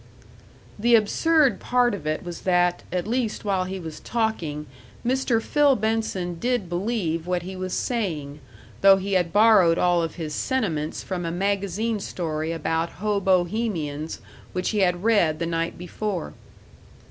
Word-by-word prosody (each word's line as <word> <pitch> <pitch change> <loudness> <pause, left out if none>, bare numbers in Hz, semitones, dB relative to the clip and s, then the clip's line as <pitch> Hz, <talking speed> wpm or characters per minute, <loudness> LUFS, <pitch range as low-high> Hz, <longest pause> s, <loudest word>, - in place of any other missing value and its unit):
The 235 +2 +5
absurd 275 - +3
part 245 -2 +2
of 155 -7 -5
it 155 0 -1
was 175 -1 -7
that, 175 -1 +2
at 180 -1 -1
least 230 -1 -2
while 190 -2 +1
he 190 +1 -5
was 160 -3 -7
talking, 180 -11 -2 0.4
Mr. 255 -2 +2
Phil 285 +3 +3
Benson 215 -6 -1
did 245 -4 0
believe 175 -3 -2
what 180 -1 -1
he 190 +1 -7
was 185 0 -3
saying, 160 - -2 0.4
though 195 0 +8
he 195 +1 -3
had 175 -3 +2
borrowed 205 -6 +5
all 175 -1 +3
of 165 -2 -3
his 155 -3 -5
sentiments 160 - -1
from 180 -2 -4
a 165 - -2
magazine 200 +4 -1
story 160 -4 -3
about 165 0 -1
hobohemians 185 -5 -1 0.3
which 180 0 -1
he 215 - 0
had 180 -1 +1
read 200 -9 +3
the 170 - -2
night 165 0 -2
before. 180 - -4
185 Hz, 150 wpm, -24 LUFS, 170-220 Hz, 0.4 s, though